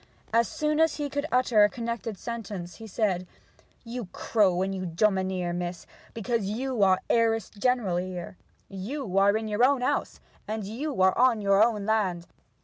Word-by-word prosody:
As 230 Hz, 0 st, +4 dB
soon 305 Hz, 0 st, -1 dB
as 320 Hz, -1 st, +3 dB
he 290 Hz, -2 st, -4 dB
could 285 Hz, +2 st, -2 dB
utter 250 Hz, -4 st, +4 dB
a 205 Hz, -, +5 dB
connected 230 Hz, -1 st, -4 dB
sentence 205 Hz, -6 st, -6 dB
he 225 Hz, -, -9 dB
said: 190 Hz, -4 st, -1 dB, 0.6 s
'You 240 Hz, 0 st, -5 dB
crow 190 Hz, -5 st, +2 dB
and 195 Hz, 0 st, -2 dB
you 190 Hz, -1 st, -4 dB
domineer, 185 Hz, -1 st, 0 dB
mistress, 175 Hz, 0 st, -4 dB, 0.3 s
because 230 Hz, -1 st, -1 dB
you 240 Hz, +3 st, -2 dB
are 190 Hz, -1 st, +4 dB
heiress 225 Hz, -2 st, +1 dB
general 215 Hz, -4 st, 0 dB
here. 180 Hz, 0 st, -5 dB, 0.3 s
You 195 Hz, +1 st, -3 dB
are 200 Hz, +2 st, +4 dB
in 220 Hz, 0 st, -4 dB
your 210 Hz, +3 st, +1 dB
own 270 Hz, 0 st, +4 dB
house; 250 Hz, -, -1 dB, 0.4 s
you 235 Hz, +6 st, -4 dB
are 190 Hz, -, +4 dB
on 245 Hz, -2 st, +4 dB
your 200 Hz, -1 st, +3 dB
own 215 Hz, -3 st, 0 dB
land. 195 Hz, -6 st, 0 dB
215 Hz, 165 wpm, -27 LUFS, 190-240 Hz, 0.6 s, a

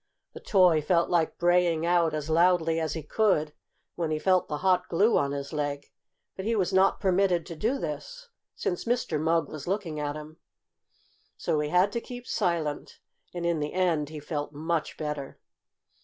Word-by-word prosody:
The -, -, -9 dB
toy 180 Hz, -6 st, +4 dB
felt 170 Hz, +3 st, +1 dB
like 170 Hz, -2 st, +1 dB
braying 175 Hz, -2 st, +2 dB
out 170 Hz, -2 st, +2 dB
as 150 Hz, -1 st, -4 dB
loudly 165 Hz, 0 st, +3 dB
as 160 Hz, -2 st, -2 dB
he 160 Hz, -, -5 dB
could 155 Hz, -3 st, +1 dB, 0.4 s
when 170 Hz, -2 st, -2 dB
he 155 Hz, -, 0 dB
felt 185 Hz, +3 st, +2 dB
the 150 Hz, -, -3 dB
hot 185 Hz, -1 st, +2 dB
glue 205 Hz, +7 st, +3 dB
on 140 Hz, -1 st, +1 dB
his 140 Hz, +1 st, -5 dB
leg, 145 Hz, -1 st, -3 dB, 0.4 s
but 190 Hz, -, -6 dB
he 225 Hz, +3 st, 0 dB
was 190 Hz, -2 st, 0 dB
not 190 Hz, +1 st, +4 dB
permitted 185 Hz, -3 st, +2 dB
to 170 Hz, -, -7 dB
do 225 Hz, -, 0 dB
this, 225 Hz, -, -6 dB, 0.3 s
since 175 Hz, -, -3 dB
Mr. 235 Hz, -10 st, 0 dB
Mugg 165 Hz, -1 st, +1 dB
was 155 Hz, -1 st, -8 dB
looking 180 Hz, -5 st, -2 dB
at 145 Hz, 0 st, -2 dB
him. 155 Hz, +1 st, -9 dB, 1.0 s
So 155 Hz, -, 0 dB
he 150 Hz, 0 st, -1 dB
had 180 Hz, +4 st, +3 dB
to 235 Hz, -, -2 dB
keep 245 Hz, 0 st, -9 dB
silent, 170 Hz, -10 st, -2 dB, 0.3 s
and 175 Hz, -1 st, -4 dB
in 170 Hz, -2 st, +1 dB
the 150 Hz, 0 st, -3 dB
end 170 Hz, -5 st, +1 dB
he 155 Hz, -1 st, -7 dB
felt 150 Hz, 0 st, -4 dB
much 160 Hz, +2 st, -2 dB
better. 150 Hz, -3 st, -5 dB
165 Hz, 185 wpm, -27 LUFS, 150-185 Hz, 1.0 s, toy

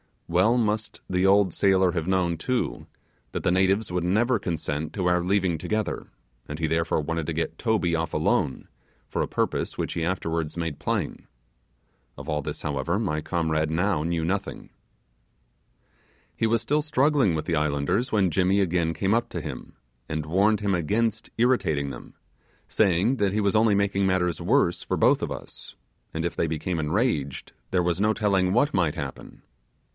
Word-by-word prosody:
Well 95 Hz, +8 st, +3 dB
must 110 Hz, -2 st, -1 dB
the 90 Hz, +1 st, +2 dB
old 100 Hz, -2 st, +4 dB
sailor 95 Hz, -2 st, +3 dB
have 85 Hz, -1 st, -3 dB
known, 90 Hz, -3 st, +1 dB
too, 125 Hz, +9 st, -2 dB, 0.5 s
that -, -, -3 dB
the -, -, +2 dB
natives 95 Hz, +2 st, +2 dB
would 90 Hz, -1 st, -1 dB
never 110 Hz, +6 st, +2 dB
consent 80 Hz, -4 st, -3 dB
to 95 Hz, -4 st, -2 dB
our 90 Hz, 0 st, +3 dB
leaving 90 Hz, -2 st, +1 dB
together, 110 Hz, +6 st, -2 dB, 0.4 s
and 75 Hz, -, -5 dB
he 80 Hz, 0 st, -1 dB
therefore 80 Hz, 0 st, 0 dB
wanted 80 Hz, +1 st, -3 dB
to 85 Hz, -, -1 dB
get 80 Hz, +1 st, -3 dB
Toby 105 Hz, -8 st, +1 dB
off 80 Hz, -1 st, -2 dB
alone, 65 Hz, -, 0 dB, 0.4 s
for -, -, -1 dB
a -, -, 0 dB
purpose -, -, -2 dB
which -, -, -2 dB
he 80 Hz, -, -1 dB
afterwards 85 Hz, -3 st, -2 dB
made 85 Hz, -4 st, -3 dB
plain. -, -, -3 dB, 0.9 s
Of 75 Hz, +3 st, -8 dB
all 75 Hz, -1 st, 0 dB
this, -, -, -5 dB
however, 75 Hz, +5 st, -1 dB
my 90 Hz, -9 st, -1 dB
comrade 80 Hz, -2 st, 0 dB
now 85 Hz, 0 st, +1 dB
knew 85 Hz, 0 st, -1 dB
nothing. 95 Hz, +5 st, -3 dB, 1.7 s
He 115 Hz, -, +1 dB
was 115 Hz, 0 st, +1 dB
still 150 Hz, +6 st, +1 dB
struggling 140 Hz, -, +2 dB
with 75 Hz, -, -2 dB
the 85 Hz, -, 0 dB
islanders 75 Hz, -, 0 dB
when 95 Hz, -5 st, +3 dB
Jimmy 95 Hz, +3 st, +2 dB
again 85 Hz, -3 st, +1 dB
came 95 Hz, +5 st, 0 dB
up 115 Hz, +1 st, +1 dB
to -, -, -4 dB
him, -, -, -8 dB, 0.3 s
and 75 Hz, -1 st, -2 dB
warned 100 Hz, +6 st, +2 dB
him 100 Hz, -1 st, +1 dB
against 110 Hz, +6 st, 0 dB
irritating 95 Hz, -, +2 dB
them, 65 Hz, -, -10 dB, 0.5 s
saying 100 Hz, +5 st, +2 dB
that 100 Hz, -4 st, +1 dB
he 105 Hz, -, +1 dB
was 100 Hz, +1 st, +1 dB
only 110 Hz, -1 st, +4 dB
making 100 Hz, -1 st, +1 dB
matters 90 Hz, -3 st, 0 dB
worse -, -, +2 dB
for -, -, -2 dB
both -, -, +4 dB
of -, -, -2 dB
us, -, -, -8 dB, 0.4 s
and 80 Hz, +1 st, -2 dB
if 85 Hz, -, -3 dB
they 85 Hz, -, +1 dB
became 80 Hz, +2 st, -2 dB
enraged, 75 Hz, -, -1 dB, 0.2 s
there 90 Hz, -, +1 dB
was 85 Hz, +2 st, 0 dB
no 105 Hz, +1 st, +3 dB
telling 95 Hz, -4 st, +1 dB
what 140 Hz, +6 st, +2 dB
might 85 Hz, -5 st, +1 dB
happen. -, -, -7 dB
90 Hz, 175 wpm, -25 LUFS, 80-105 Hz, 1.7 s, old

